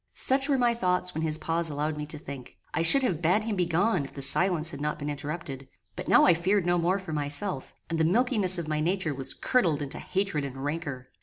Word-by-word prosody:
Such 270 Hz, +2 st, +5 dB
were 275 Hz, -, +3 dB
my 240 Hz, -2 st, +2 dB
thoughts 180 Hz, -4 st, 0 dB
when 160 Hz, -, -3 dB
his 155 Hz, -1 st, +2 dB
pause 165 Hz, +1 st, -1 dB
allowed 150 Hz, +1 st, -2 dB
me 150 Hz, 0 st, -6 dB
to 155 Hz, -, -6 dB
think. 140 Hz, -4 st, -10 dB, 0.2 s
I -, -, 0 dB
should 270 Hz, +12 st, +7 dB
have 175 Hz, -10 st, -1 dB
bad 180 Hz, +6 st, +2 dB
him 220 Hz, -1 st, -2 dB
begone 180 Hz, 0 st, +1 dB
if 135 Hz, -, -10 dB
the 140 Hz, -, -5 dB
silence 170 Hz, +3 st, +2 dB
had 140 Hz, -2 st, -8 dB
not 150 Hz, 0 st, -2 dB
been 150 Hz, 0 st, -4 dB
interrupted; 145 Hz, -2 st, -6 dB, 0.3 s
but 180 Hz, -, -7 dB
now -, -, +6 dB
I 180 Hz, -, +6 dB
feared 185 Hz, +3 st, 0 dB
no 175 Hz, 0 st, +2 dB
more 175 Hz, +3 st, +1 dB
for 190 Hz, -5 st, -7 dB
myself; 145 Hz, +1 st, -3 dB
and 165 Hz, -1 st, -3 dB
the -, -, +3 dB
milkiness 200 Hz, 0 st, +2 dB
of 170 Hz, -2 st, -4 dB
my 155 Hz, -1 st, -1 dB
nature 175 Hz, -1 st, -1 dB
was 135 Hz, -1 st, -3 dB
curdled 165 Hz, -, +1 dB
into 140 Hz, +2 st, -6 dB
hatred 190 Hz, -6 st, -2 dB
and 135 Hz, -1 st, -6 dB
rancour. 145 Hz, -2 st, -4 dB
165 Hz, 235 wpm, -27 LUFS, 150-185 Hz, 0.3 s, should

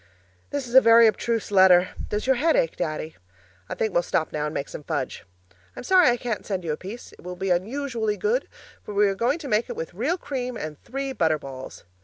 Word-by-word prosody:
This 285 Hz, -2 st, -3 dB
is 240 Hz, -, -9 dB
a 260 Hz, -, +9 dB
very 230 Hz, 0 st, +7 dB
abstruse 225 Hz, 0 st, 0 dB
letter 185 Hz, -2 st, +6 dB, 0.2 s
does 210 Hz, 0 st, -2 dB
your 265 Hz, -1 st, +3 dB
head 320 Hz, +5 st, +3 dB
ache, 165 Hz, -, +1 dB
Daddy? 155 Hz, 0 st, -4 dB, 0.5 s
I -, -, -3 dB
think 220 Hz, -3 st, -1 dB
we'll 175 Hz, -, +3 dB
stop 160 Hz, -2 st, -1 dB
now 150 Hz, -1 st, -1 dB
and 150 Hz, -, -4 dB
make 140 Hz, -, -2 dB
some -, -, -8 dB
fudge. 140 Hz, -6 st, -4 dB, 0.5 s
I'm -, -, -7 dB
sorry 365 Hz, -1 st, +5 dB
I 240 Hz, -, +2 dB
can't 235 Hz, -3 st, -3 dB
send 190 Hz, -3 st, -3 dB
you 165 Hz, -, -2 dB
a -, -, -1 dB
piece; 200 Hz, +9 st, -9 dB
it -, -, -17 dB
will 180 Hz, +1 st, -7 dB
be 190 Hz, +1 st, -2 dB
unusually 220 Hz, +3 st, -1 dB
good, 465 Hz, +4 st, 0 dB, 0.3 s
for 210 Hz, -, -8 dB
we're 200 Hz, -1 st, +3 dB
going 235 Hz, +9 st, 0 dB
to 315 Hz, -4 st, -8 dB
make 220 Hz, -1 st, +1 dB
it -, -, -4 dB
with 165 Hz, -, -6 dB
real 265 Hz, -, -1 dB
cream 250 Hz, -7 st, -4 dB
and 155 Hz, -5 st, -7 dB
three 275 Hz, +1 st, -4 dB
butter 160 Hz, -8 st, +2 dB
balls. 135 Hz, -2 st, -9 dB
210 Hz, 230 wpm, -24 LUFS, 175-255 Hz, 0.5 s, a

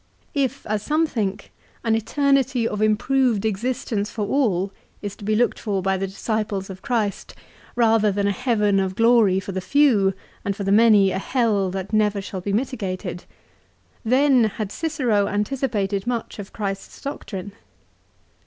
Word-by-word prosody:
If, 275 Hz, -2 st, -1 dB
as 215 Hz, -1 st, -1 dB
some 305 Hz, +8 st, +1 dB
think, 210 Hz, -10 st, -3 dB, 0.3 s
an 225 Hz, -, +2 dB
eternity 265 Hz, +1 st, +1 dB
of 210 Hz, -1 st, -3 dB
improved 225 Hz, +1 st, +2 dB
existence 220 Hz, -1 st, -1 dB
for 210 Hz, -1 st, -3 dB
all 200 Hz, -6 st, +1 dB, 0.3 s
is 205 Hz, -1 st, -4 dB
to -, -, -12 dB
be 215 Hz, +1 st, +1 dB
looked 240 Hz, +3 st, +1 dB
for 200 Hz, -4 st, -2 dB
by 195 Hz, 0 st, +1 dB
the 195 Hz, +1 st, -2 dB
disciples 200 Hz, -1 st, -3 dB
of 190 Hz, 0 st, -10 dB
Christ, 225 Hz, -6 st, -2 dB, 0.4 s
rather 225 Hz, -3 st, +3 dB
than 200 Hz, +1 st, -1 dB
a 200 Hz, -, +2 dB
heaven 210 Hz, -4 st, +1 dB
of 190 Hz, -1 st, -1 dB
glory 225 Hz, -4 st, +4 dB
for 195 Hz, +1 st, -6 dB
the 190 Hz, 0 st, -3 dB
few 205 Hz, -4 st, +3 dB, 0.3 s
and 200 Hz, -1 st, -2 dB
for 200 Hz, -, -5 dB
the 195 Hz, -, 0 dB
many 210 Hz, -2 st, +6 dB
a -, -, -1 dB
hell 210 Hz, -5 st, +1 dB
that 190 Hz, +3 st, -5 dB
never 210 Hz, -1 st, +2 dB
shall 195 Hz, -1 st, -6 dB
be 200 Hz, -, -3 dB
mitigated, 195 Hz, -6 st, -3 dB, 0.8 s
then 255 Hz, +1 st, +4 dB
had 215 Hz, -1 st, -3 dB
Cicero 250 Hz, -11 st, 0 dB
anticipated 205 Hz, -2 st, -1 dB
much 235 Hz, -3 st, -3 dB
of 195 Hz, -, -8 dB
Christ's 195 Hz, -2 st, -5 dB
doctrine. 205 Hz, -8 st, -6 dB
210 Hz, 160 wpm, -23 LUFS, 195-245 Hz, 0.8 s, many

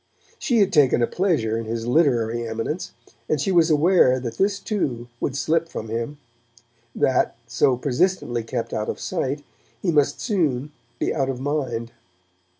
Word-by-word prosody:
She 240 Hz, -6 st, +2 dB
had 195 Hz, -1 st, +2 dB
taken 135 Hz, -6 st, +4 dB
a -, -, +5 dB
pleasure 155 Hz, -, 0 dB
in 115 Hz, -, -5 dB
his 115 Hz, +1 st, -3 dB
literary 120 Hz, -5 st, +2 dB
eminence, 115 Hz, +10 st, -4 dB, 0.4 s
and 155 Hz, -, +1 dB
she 190 Hz, -, 0 dB
was 170 Hz, -2 st, +4 dB
aware 155 Hz, -4 st, +4 dB
that 120 Hz, -2 st, -6 dB
this, 200 Hz, +1 st, +2 dB
too, 130 Hz, -, -2 dB
would 135 Hz, -, -2 dB
slip 165 Hz, +3 st, +1 dB
from 110 Hz, -, -6 dB
him; 115 Hz, +6 st, -3 dB, 0.8 s
that, 130 Hz, -3 st, +2 dB
so 125 Hz, +2 st, +2 dB
persistently 135 Hz, -3 st, 0 dB
kept 115 Hz, 0 st, -4 dB
out 110 Hz, 0 st, -2 dB
of -, -, -4 dB
sight, 145 Hz, -5 st, -2 dB, 0.4 s
he 180 Hz, -, 0 dB
must 145 Hz, -3 st, +2 dB
soon 150 Hz, -, 0 dB, 0.3 s
be -, -, 0 dB
out 135 Hz, -1 st, 0 dB
of 130 Hz, -2 st, -3 dB
mind. 130 Hz, -5 st, -2 dB
135 Hz, 160 wpm, -23 LUFS, 120-165 Hz, 0.8 s, a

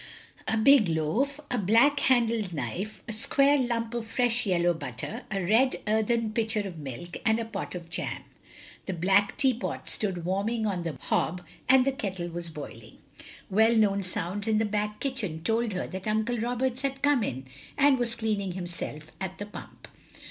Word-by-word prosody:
A 220 Hz, -, +1 dB
big 235 Hz, -1 st, +6 dB
loaf, 215 Hz, -, 0 dB
a 250 Hz, -, +1 dB
black 230 Hz, +9 st, +4 dB
handled 230 Hz, -8 st, +2 dB
knife, 195 Hz, +6 st, -4 dB
a 230 Hz, -, -4 dB
square 275 Hz, +6 st, +3 dB
Itunp 235 Hz, -2 st, -1 dB
of 235 Hz, -2 st, -3 dB
fresh 240 Hz, 0 st, +1 dB
yellow 175 Hz, -2 st, +3 dB
butter, 145 Hz, -2 st, -6 dB
a 195 Hz, -2 st, -1 dB
red 235 Hz, +7 st, +4 dB
earthen 220 Hz, +1 st, +1 dB
pitcher 220 Hz, -1 st, 0 dB
of 185 Hz, -5 st, -6 dB
milk, 150 Hz, +5 st, -7 dB
and 220 Hz, 0 st, +3 dB
a 230 Hz, -, -2 dB
pot 215 Hz, -4 st, -5 dB
of 170 Hz, -2 st, -7 dB
jam. 170 Hz, -, -4 dB, 0.6 s
The 190 Hz, -, -1 dB
black 195 Hz, +4 st, +3 dB
teapot 260 Hz, -4 st, 0 dB
stood 185 Hz, -5 st, -2 dB
warming 210 Hz, +5 st, 0 dB
on 190 Hz, -4 st, -1 dB
the 165 Hz, -5 st, -4 dB
hob, 180 Hz, +2 st, 0 dB, 0.2 s
and 260 Hz, -1 st, +6 dB
the 275 Hz, -, +3 dB
kettle 190 Hz, -8 st, -4 dB
was 170 Hz, 0 st, -5 dB
boiling. 115 Hz, -8 st, -9 dB, 0.5 s
Well 220 Hz, +4 st, +5 dB
known 200 Hz, -3 st, +3 dB
sounds 185 Hz, +3 st, -3 dB
in 220 Hz, -1 st, +3 dB
the 220 Hz, -, +2 dB
back 210 Hz, 0 st, -2 dB
kitchen 215 Hz, -, -3 dB
told 225 Hz, +2 st, +1 dB
her 180 Hz, -, -2 dB
that 190 Hz, +2 st, -6 dB
Uncle 220 Hz, +3 st, 0 dB
Roberts 245 Hz, +2 st, -1 dB
had 275 Hz, 0 st, -3 dB
come 290 Hz, -3 st, +4 dB
in, 130 Hz, -, -3 dB, 0.3 s
and 280 Hz, -2 st, +5 dB
was 235 Hz, -1 st, 0 dB
cleaning 210 Hz, -5 st, -1 dB
himself 170 Hz, -4 st, -6 dB
at 190 Hz, -1 st, -4 dB
the 205 Hz, -, -5 dB
pump. 210 Hz, -, -11 dB
215 Hz, 175 wpm, -28 LUFS, 180-235 Hz, 0.6 s, big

